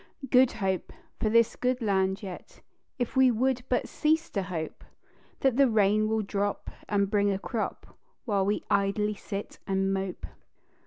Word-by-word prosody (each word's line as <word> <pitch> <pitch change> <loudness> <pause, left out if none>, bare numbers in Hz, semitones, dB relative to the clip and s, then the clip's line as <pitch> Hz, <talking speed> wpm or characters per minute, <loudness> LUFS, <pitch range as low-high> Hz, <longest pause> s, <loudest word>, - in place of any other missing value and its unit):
"Good 255 0 +5
Hope" 190 -5 -2 0.3
for 215 - +1
this 230 +1 +4
good 250 0 0
land 195 -2 0
yet, 185 -3 -9 0.4
If 245 0 -3
we 260 -1 +6
would 250 +2 +1
but 250 - +1
cease 320 +2 0
to 200 - -1
hope 175 -4 -5 0.6
That 265 -3 +2
the 275 -2 +5
rain 215 0 +3
will 220 -1 +1
drop 200 0 -2 0.2
and 200 -1 +2
bring 205 0 +2
a 195 - +1
crop 220 +3 -5 0.3
While 200 -4 +1
we 205 - 0
idly 205 +1 +1
sit 200 0 -7
and 195 0 +1
mope. 190 -1 -3
210 Hz, 160 wpm, -28 LUFS, 195-240 Hz, 0.6 s, we